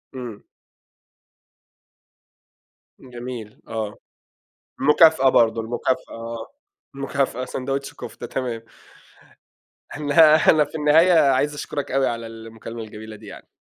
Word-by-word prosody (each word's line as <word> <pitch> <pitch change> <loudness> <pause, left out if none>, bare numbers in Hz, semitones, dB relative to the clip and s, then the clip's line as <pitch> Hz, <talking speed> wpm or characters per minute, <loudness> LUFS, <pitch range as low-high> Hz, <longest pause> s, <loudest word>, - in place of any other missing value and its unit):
إمم. 120 -5 -7 2.6
جميل، 120 -3 -8
آه. 110 -2 -4 0.9
المكافأة 150 -1 +5
برضه، 115 -2 +3
المكافأة، 120 +3 -2
آه. 115 0 -6 0.5
مكافأة 135 -2 -2
سندويش 135 +2 -4
كفتة، - - -8
تمام. 120 -3 -4 1.3
النها 155 +1 +5
أنا 155 -1 +4
في 145 - -16
النهاية 160 +5 +5 0.2
عايز 145 +3 +1
أشكُرك 145 -1 -5
أوي 135 0 +2
على 115 -1 -3
المكالمة 115 0 -9
الجميلة 110 0 -9
دي 105 +1 -15
يعني. - - -11
125 Hz, 100 wpm, -22 LUFS, 115-145 Hz, 2.6 s, المكافأة